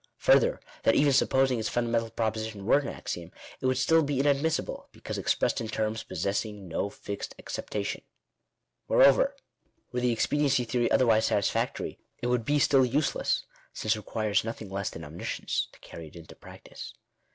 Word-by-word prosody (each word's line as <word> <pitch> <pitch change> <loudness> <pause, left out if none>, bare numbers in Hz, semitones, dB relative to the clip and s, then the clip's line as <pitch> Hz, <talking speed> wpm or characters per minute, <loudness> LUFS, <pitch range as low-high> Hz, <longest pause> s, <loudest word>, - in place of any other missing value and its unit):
Further, - - +4 0.2
that - - +3
even 145 -1 +4
supposing 130 -1 +3
its 110 - -1
fundamental 115 -1 0
proposition 110 -2 -3
were 130 - +5
an 145 - -5
axiom, 85 0 -6 0.3
it 130 - -1
would 130 0 +2
still 160 +5 +4
be 145 -3 -1
inadmissible, 145 +3 0
because - - -6
expressed - - +1
in 115 - -3
terms 110 0 -2
possessing 100 +2 -3
no 85 +4 -2
fixed 100 0 -7
acceptation. - - -4 0.9
Moreover, - - +5 0.6
were 125 - -1
the 125 0 +2
expediency 135 +2 +2
theory 120 0 0
otherwise 110 -3 +4
satisfactory, 100 -2 -1 0.2
it - - -5
would 120 -2 0
be 145 +3 +2
still 135 -1 +4
useless; 135 +4 0 0.3
since 110 0 0
it - - -6
requires 105 -1 0
nothing 110 -3 -6
less 100 0 -2
than 80 - -9
omniscience 75 +3 -3
to - - -19
carry 80 -1 -10
it 75 - -16
into 85 -1 -12
practice. - - -11
115 Hz, 165 wpm, -28 LUFS, 105-135 Hz, 0.9 s, were